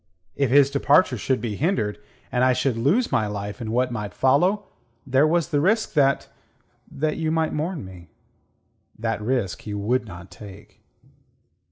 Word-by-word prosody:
If 140 Hz, -3 st, +1 dB
his 140 Hz, +1 st, +5 dB
departure 140 Hz, +1 st, +3 dB
should 130 Hz, +3 st, -1 dB
be 110 Hz, -4 st, -4 dB
hindered, 110 Hz, -, -1 dB, 0.3 s
and 125 Hz, 0 st, +1 dB
I 130 Hz, 0 st, +4 dB
should 130 Hz, -1 st, 0 dB
lose 150 Hz, -, +1 dB
my 120 Hz, -5 st, +1 dB
life 105 Hz, +2 st, -5 dB
in 110 Hz, -, -4 dB
what 125 Hz, +2 st, +1 dB
might 105 Hz, -4 st, -5 dB
follow, 180 Hz, +11 st, +2 dB, 0.4 s
there 135 Hz, +3 st, +3 dB
was 170 Hz, +1 st, +1 dB
the 145 Hz, -3 st, +1 dB
risk 220 Hz, +7 st, +1 dB
that... 140 Hz, -3 st, +2 dB, 0.6 s
that 155 Hz, +2 st, -2 dB
you 160 Hz, -1 st, -1 dB
might 160 Hz, -1 st, 0 dB
mourn 155 Hz, -, -3 dB
me. 90 Hz, -3 st, -12 dB, 0.9 s
That 95 Hz, -, -2 dB
risk 115 Hz, -5 st, -1 dB
he 105 Hz, -1 st, -6 dB
would 115 Hz, +4 st, -1 dB
not 90 Hz, -1 st, -11 dB
take. 100 Hz, -1 st, -13 dB
130 Hz, 165 wpm, -23 LUFS, 105-150 Hz, 0.9 s, his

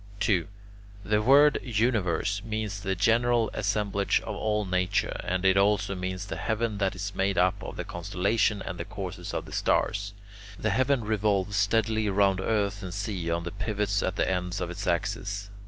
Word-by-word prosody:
2. 90 Hz, -6 st, +2 dB, 0.6 s
The 105 Hz, 0 st, +2 dB
word 140 Hz, +6 st, +6 dB
"universe" 105 Hz, -4 st, 0 dB
means 110 Hz, -2 st, -3 dB
the 95 Hz, -1 st, -2 dB
general 115 Hz, +3 st, +2 dB
assemblage 100 Hz, -1 st, 0 dB
of -, -, -5 dB
all 105 Hz, -1 st, 0 dB
nature, 90 Hz, -1 st, 0 dB
and 90 Hz, +1 st, -1 dB
it 95 Hz, 0 st, +5 dB
also 100 Hz, 0 st, +2 dB
means 95 Hz, +1 st, -4 dB
the -, -, -5 dB
heaven 110 Hz, -2 st, -1 dB
that 95 Hz, -2 st, 0 dB
is 100 Hz, +2 st, -4 dB
made 95 Hz, +1 st, 0 dB
up 90 Hz, 0 st, +2 dB
of -, -, -7 dB
the -, -, -3 dB
constellations 100 Hz, +4 st, 0 dB
and 90 Hz, -3 st, -5 dB
the 85 Hz, -, -3 dB
courses 95 Hz, -3 st, -6 dB
of -, -, -3 dB
the -, -, -12 dB
stars. 100 Hz, 0 st, 0 dB, 0.4 s
The 110 Hz, -, 0 dB
heaven 130 Hz, +3 st, +2 dB
revolves 100 Hz, -2 st, 0 dB
steadily 110 Hz, +1 st, +2 dB
round 95 Hz, -1 st, +3 dB
earth 100 Hz, 0 st, 0 dB
and 90 Hz, -1 st, -6 dB
sea 95 Hz, -4 st, -3 dB
on 85 Hz, 0 st, -1 dB
the 85 Hz, -, -5 dB
pivots 100 Hz, -1 st, -1 dB
at 95 Hz, -, -1 dB
the -, -, +1 dB
ends 90 Hz, +1 st, -1 dB
of 90 Hz, -1 st, -3 dB
its 95 Hz, +3 st, -6 dB
axis. 100 Hz, +3 st, -2 dB
100 Hz, 180 wpm, -27 LUFS, 95-105 Hz, 0.6 s, word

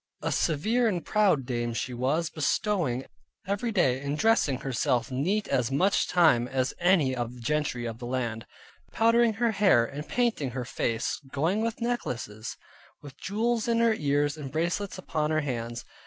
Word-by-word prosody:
A -, -, 0 dB
severe 220 Hz, +11 st, +1 dB
and 180 Hz, -6 st, -1 dB
proud 200 Hz, -, +2 dB
dame 120 Hz, -2 st, -2 dB
she 125 Hz, -, -3 dB
was, 140 Hz, +7 st, 0 dB
bestowing 155 Hz, -, 0 dB, 0.4 s
every 200 Hz, +4 st, -1 dB
day 135 Hz, -, +2 dB
in 140 Hz, +1 st, -2 dB
dressing 160 Hz, -, +2 dB
herself 125 Hz, -2 st, 0 dB
neat 185 Hz, +12 st, 0 dB
as 125 Hz, -1 st, +1 dB
much 185 Hz, +9 st, +2 dB
time 155 Hz, -9 st, +4 dB
as 130 Hz, 0 st, -1 dB
any 170 Hz, -8 st, +3 dB
of 120 Hz, 0 st, -4 dB
the -, -, -12 dB
gentry 145 Hz, -1 st, -1 dB
of 115 Hz, -1 st, -5 dB
the 120 Hz, -, -6 dB
land: 120 Hz, -3 st, -3 dB, 0.4 s
powdering 230 Hz, 0 st, +3 dB
her 230 Hz, +2 st, +1 dB
hair, 195 Hz, -, +4 dB
and 145 Hz, +5 st, -7 dB
painting 235 Hz, -, 0 dB
her 125 Hz, -, -3 dB
face, 115 Hz, +1 st, -2 dB
going 165 Hz, +9 st, 0 dB
with 230 Hz, 0 st, -2 dB
necklaces, 120 Hz, -, -3 dB, 0.5 s
with 145 Hz, -2 st, -11 dB
jewels 225 Hz, +3 st, -1 dB
in 230 Hz, -1 st, +2 dB
her 230 Hz, -1 st, +4 dB
ears, 145 Hz, -4 st, 0 dB
and 140 Hz, -3 st, -7 dB
bracelets 175 Hz, +6 st, -2 dB
upon 155 Hz, -4 st, -2 dB
her 155 Hz, 0 st, +1 dB
hands. 120 Hz, -4 st, -4 dB
150 Hz, 170 wpm, -27 LUFS, 125-205 Hz, 0.5 s, time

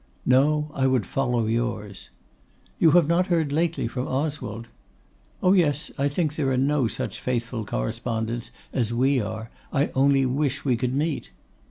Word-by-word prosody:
'No, 150 Hz, +4 st, +3 dB
I 135 Hz, -2 st, +1 dB
would 130 Hz, -6 st, +2 dB
follow 125 Hz, 0 st, 0 dB
yours.' 110 Hz, -3 st, -3 dB, 0.7 s
'You 165 Hz, -, +6 dB
have 170 Hz, -4 st, +4 dB
not 175 Hz, +3 st, +2 dB
heard 165 Hz, -5 st, +1 dB
lately 160 Hz, -3 st, 0 dB
from 125 Hz, +2 st, -4 dB
Oswald?' 130 Hz, -5 st, -3 dB, 0.8 s
'Oh, 185 Hz, -, +5 dB
yes; 150 Hz, -6 st, +2 dB
I 140 Hz, 0 st, +1 dB
think 150 Hz, +1 st, -1 dB
there 145 Hz, -4 st, 0 dB
are 130 Hz, -, +1 dB
no 135 Hz, -1 st, +2 dB
such -, -, -4 dB
faithful 120 Hz, -2 st, -2 dB
correspondents 110 Hz, -, -3 dB, 0.2 s
as 120 Hz, -3 st, 0 dB
we 130 Hz, +2 st, +2 dB
are; 110 Hz, +2 st, -5 dB, 0.2 s
I 140 Hz, +2 st, +1 dB
only 135 Hz, 0 st, +3 dB
wish 140 Hz, +2 st, -1 dB
we 130 Hz, -3 st, +3 dB
could 125 Hz, +2 st, -1 dB
meet. 150 Hz, -, -1 dB
130 Hz, 160 wpm, -25 LUFS, 120-150 Hz, 0.8 s, You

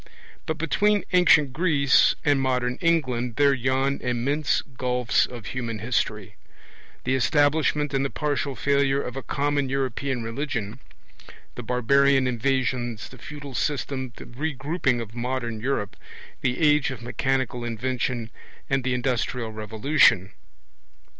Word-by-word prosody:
But 160 Hz, -, -2 dB
between 205 Hz, +5 st, +2 dB
ancient 155 Hz, -7 st, +5 dB
Greece 145 Hz, -4 st, +4 dB
and 145 Hz, -2 st, +3 dB
modern 125 Hz, -1 st, 0 dB
England 130 Hz, -9 st, +1 dB
there 140 Hz, +1 st, +4 dB
yawn 135 Hz, +2 st, 0 dB
immense 130 Hz, +4 st, 0 dB
gulfs 125 Hz, -2 st, 0 dB
of 120 Hz, -4 st, -9 dB
human 115 Hz, -3 st, -4 dB
history; 110 Hz, +2 st, -2 dB, 0.7 s
the 130 Hz, -, 0 dB
establishment 145 Hz, +2 st, +2 dB
and 135 Hz, 0 st, +1 dB
the 135 Hz, -, -1 dB
partial 145 Hz, -2 st, -2 dB
failure 140 Hz, 0 st, +2 dB
of 125 Hz, -2 st, -5 dB
a 135 Hz, -, -4 dB
common 145 Hz, 0 st, -1 dB
European 130 Hz, -1 st, -2 dB
religion, 115 Hz, -2 st, -4 dB, 0.7 s
the -, -, -7 dB
barbarian 135 Hz, +3 st, +3 dB
invasions, 125 Hz, -2 st, -1 dB
the 130 Hz, -, -14 dB
feudal 145 Hz, 0 st, -9 dB
system, 130 Hz, 0 st, -2 dB
the -, -, -10 dB
regrouping 140 Hz, 0 st, -1 dB
of 115 Hz, -1 st, -8 dB
modern 120 Hz, -2 st, -3 dB
Europe, 115 Hz, -4 st, -2 dB, 0.5 s
the 125 Hz, -1 st, 0 dB
age 150 Hz, -3 st, +4 dB
of 125 Hz, -4 st, -7 dB
mechanical 125 Hz, 0 st, -1 dB
invention, 120 Hz, 0 st, -2 dB, 0.4 s
and 135 Hz, -1 st, +1 dB
the 130 Hz, 0 st, 0 dB
industrial 125 Hz, -2 st, -1 dB
revolution. 110 Hz, -2 st, +2 dB
130 Hz, 125 wpm, -25 LUFS, 120-140 Hz, 0.7 s, ancient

